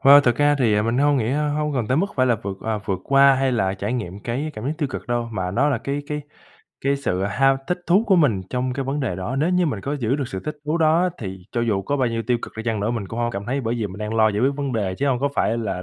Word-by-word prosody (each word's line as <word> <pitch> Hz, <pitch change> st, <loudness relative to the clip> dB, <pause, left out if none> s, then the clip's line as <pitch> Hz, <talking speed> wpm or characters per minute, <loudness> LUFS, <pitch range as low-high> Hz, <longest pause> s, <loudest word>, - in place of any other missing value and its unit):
Ơ, 140 Hz, +1 st, +9 dB
thực 120 Hz, -4 st, +2 dB
ra 145 Hz, 0 st, +4 dB
thì 105 Hz, -5 st, +3 dB
mình 115 Hz, +3 st, 0 dB
hông 145 Hz, 0 st, +3 dB
nghĩ 115 Hz, 0 st, 0 dB
hông 150 Hz, 0 st, 0 dB
cần 120 Hz, -4 st, 0 dB
tới 130 Hz, -, +2 dB
mức 195 Hz, +5 st, +2 dB
phải 130 Hz, -, +3 dB
là 120 Hz, -2 st, +3 dB
vượt, 95 Hz, -1 st, -4 dB
ờ, 110 Hz, -1 st, -2 dB
vượt 95 Hz, -3 st, -1 dB
qua 140 Hz, 0 st, +6 dB
hay 130 Hz, -1 st, +1 dB
là 95 Hz, -4 st, +1 dB
trải 100 Hz, +4 st, -3 dB
nghiệm 105 Hz, -5 st, -4 dB
cái 135 Hz, +6 st, -2 dB
cảm 110 Hz, -, -6 dB
giác 145 Hz, -, 0 dB
tiêu 145 Hz, -4 st, 0 dB
cực -, -, -6 dB
đâu. 120 Hz, -1 st, -1 dB
Mà 95 Hz, -3 st, -2 dB
nó 130 Hz, +10 st, +2 dB
là 135 Hz, -6 st, +1 dB
cái 140 Hz, +3 st, -3 dB
cái 150 Hz, 0 st, -3 dB, 0.6 s
cái 140 Hz, 0 st, +2 dB
sự 95 Hz, -9 st, -1 dB
ham 135 Hz, +7 st, +3 dB
thích 180 Hz, -, -1 dB
thú 195 Hz, +6 st, +4 dB
của 190 Hz, -3 st, +4 dB
mình 130 Hz, -, +3 dB
trong 125 Hz, 0 st, -1 dB
cái 135 Hz, +1 st, -3 dB
vấn 140 Hz, +2 st, -2 dB
đề 110 Hz, -10 st, -2 dB
đó. 105 Hz, +8 st, -3 dB
Nếu 155 Hz, +6 st, +1 dB
như 180 Hz, -1 st, +2 dB
mình 110 Hz, -9 st, -2 dB
có 140 Hz, +6 st, -3 dB
giữ 130 Hz, 0 st, 0 dB
được 140 Hz, -4 st, -3 dB
sự 95 Hz, -, -5 dB
thích 150 Hz, -, -4 dB
thú 160 Hz, +3 st, 0 dB
đó 165 Hz, +3 st, +3 dB
thì 95 Hz, -3 st, -6 dB
cho 120 Hz, -, 0 dB
dù 105 Hz, -4 st, 0 dB
có 140 Hz, +9 st, -1 dB
bao 130 Hz, -3 st, +1 dB
nhiêu 115 Hz, 0 st, -2 dB
tiêu 120 Hz, -1 st, +2 dB
cực -, -, -7 dB
đi 110 Hz, -, -4 dB
chăng 115 Hz, -3 st, -1 dB
nữa 105 Hz, -, 0 dB
mình 110 Hz, -5 st, -3 dB
cũng 115 Hz, -, -6 dB
hông 120 Hz, 0 st, 0 dB
có 100 Hz, -, -3 dB
cảm 100 Hz, -, -10 dB
thấy, 135 Hz, +3 st, -1 dB
bởi 115 Hz, 0 st, -1 dB
vì 115 Hz, -3 st, -1 dB
mình 95 Hz, +1 st, -9 dB
đang 105 Hz, +1 st, -3 dB
lo 110 Hz, -1 st, +5 dB
giải 105 Hz, 0 st, -1 dB
quyết 135 Hz, +3 st, +3 dB
vấn 140 Hz, -2 st, -2 dB
đề 100 Hz, -5 st, -1 dB
chứ 140 Hz, -, 0 dB
hông 125 Hz, -2 st, +1 dB
có 140 Hz, -, +2 dB
phải 115 Hz, -, +1 dB
là 95 Hz, -5 st, -3 dB
125 Hz, 320 wpm, -22 LUFS, 110-140 Hz, 0.6 s, Ơ